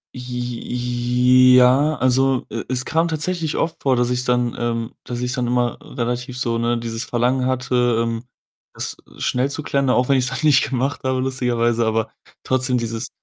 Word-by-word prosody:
J 125 Hz, -1 st, -5 dB
j 125 Hz, +1 st, +3 dB
ja, 135 Hz, +5 st, +4 dB
also, 130 Hz, 0 st, +2 dB
e 115 Hz, +1 st, -4 dB
es 130 Hz, 0 st, 0 dB
kam 165 Hz, +1 st, +1 dB
tatsächlich 165 Hz, 0 st, -2 dB
oft 165 Hz, 0 st, -2 dB
vor, 135 Hz, -2 st, +2 dB
dass 125 Hz, 0 st, +1 dB
ich 125 Hz, 0 st, 0 dB
dann, 125 Hz, -1 st, +1 dB
ähm 115 Hz, -1 st, -2 dB
dass 120 Hz, 0 st, -5 dB
ich 125 Hz, 0 st, -1 dB
dann 125 Hz, -2 st, -1 dB
immer 120 Hz, 0 st, 0 dB
relativ 125 Hz, +1 st, -4 dB
so, 115 Hz, -2 st, -1 dB
ne, 120 Hz, 0 st, 0 dB
dieses 115 Hz, 0 st, -4 dB
Verlangen 125 Hz, +2 st, 0 dB
hatte, 125 Hz, -2 st, +1 dB
ähm, 115 Hz, 0 st, -3 dB, 0.5 s
das -, -, -4 dB, 0.2 s
schnell 130 Hz, +2 st, 0 dB
zu 150 Hz, +2 st, -5 dB
klären, 140 Hz, -2 st, 0 dB
auch 125 Hz, +1 st, +2 dB
wenn 135 Hz, -, +4 dB
ich's 125 Hz, -1 st, +1 dB
dann 135 Hz, -, -3 dB
nicht 145 Hz, -3 st, +4 dB
gemacht 135 Hz, +2 st, -1 dB
habe 130 Hz, 0 st, 0 dB
lustigerweise. 120 Hz, -3 st, 0 dB
Aber 110 Hz, 0 st, 0 dB, 0.3 s
trotzdem 130 Hz, -1 st, 0 dB
dieses 115 Hz, 0 st, -3 dB
125 Hz, 180 wpm, -21 LUFS, 120-130 Hz, 0.5 s, ja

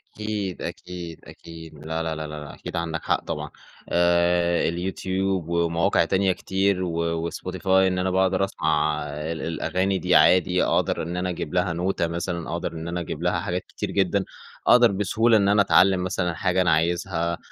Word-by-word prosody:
أكيد، 105 Hz, -3 st, -4 dB
أكيد، 85 Hz, -1 st, -7 dB
أكيد. 80 Hz, -1 st, -11 dB
لا، 80 Hz, +1 st, -2 dB
لا، 80 Hz, -1 st, -2 dB
لا، 80 Hz, 0 st, -5 dB
لا، 75 Hz, 0 st, -7 dB
لا -, -, -10 dB
أكيد -, -, -8 dB
عندك 85 Hz, -1 st, -3 dB
حق -, -, 0 dB
طبعًا. -, -, -4 dB, 0.4 s
آآ 85 Hz, 0 st, +2 dB
اليوتيوب 95 Hz, 0 st, -2 dB
ومواقع 85 Hz, +2 st, +2 dB
تانية 95 Hz, +2 st, +2 dB
كتير 95 Hz, +1 st, 0 dB
و 85 Hz, -1 st, -1 dB
وSpotify 90 Hz, +4 st, -7 dB
إن 95 Hz, -1 st, +4 dB
أنا 95 Hz, 0 st, 0 dB
باقدر 95 Hz, +1 st, +2 dB
أسمع 75 Hz, -4 st, 0 dB
ال 75 Hz, +3 st, -5 dB
الأغاني 90 Hz, +4 st, -1 dB
دي 90 Hz, 0 st, +2 dB
عادي، 90 Hz, 0 st, +5 dB
أقدر -, -, +1 dB
إن 85 Hz, +2 st, -4 dB
أنا 90 Hz, +1 st, -1 dB
أجيب 85 Hz, -3 st, -5 dB
لها 90 Hz, -1 st, +1 dB
نوتة 90 Hz, 0 st, -1 dB
مثلًا 85 Hz, 0 st, -4 dB
أو -, -, -3 dB
أقدر 85 Hz, -, -3 dB
إن 80 Hz, 0 st, -6 dB
أنا 85 Hz, +1 st, -3 dB
أجيب 85 Hz, -, -5 dB
لها -, -, +1 dB
حاجات -, -, -2 dB
كتير -, -, -5 dB
جدًا. -, -, +1 dB, 0.4 s
أقدر 120 Hz, -2 st, +6 dB
بسهولة 110 Hz, +4 st, +2 dB
إن 100 Hz, -2 st, +2 dB
أنا 100 Hz, 0 st, +5 dB
أتعلّم 95 Hz, -2 st, +4 dB
مثلًا 90 Hz, -1 st, -1 dB
حاجة 90 Hz, +2 st, +1 dB
أنا 85 Hz, -2 st, +3 dB
عايزها 85 Hz, +1 st, 0 dB
90 Hz, 180 wpm, -24 LUFS, 85-95 Hz, 0.4 s, أقدر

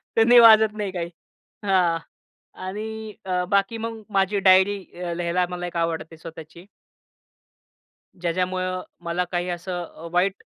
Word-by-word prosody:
त्यांनी 235 Hz, +2 st, +7 dB
वाजत 220 Hz, -2 st, +7 dB
नाही 205 Hz, -2 st, -2 dB
काही. 170 Hz, -2 st, -4 dB, 0.6 s
हां, 180 Hz, -4 st, +2 dB, 0.7 s
आणि 220 Hz, +2 st, -6 dB
अ, 180 Hz, -1 st, 0 dB
बाकी 200 Hz, +3 st, +1 dB
मग 225 Hz, 0 st, -5 dB
माझी 195 Hz, 0 st, +1 dB
डायरी 190 Hz, +2 st, +5 dB, 0.2 s
अ, 175 Hz, -1 st, -3 dB
लिहायला 175 Hz, +1 st, 0 dB
मला 175 Hz, 0 st, -4 dB
एक 175 Hz, -, -6 dB
आवडते 165 Hz, -1 st, -2 dB
स्वतःची. 165 Hz, +1 st, -11 dB, 1.6 s
ज्याच्यामुळं 185 Hz, +1 st, -1 dB, 0.2 s
मला 170 Hz, +1 st, -1 dB
काही 175 Hz, 0 st, -1 dB
असं 175 Hz, +1 st, -4 dB
अ, 165 Hz, 0 st, -11 dB
वाईट 185 Hz, +2 st, +1 dB
185 Hz, 130 wpm, -24 LUFS, 170-205 Hz, 1.6 s, त्यांनी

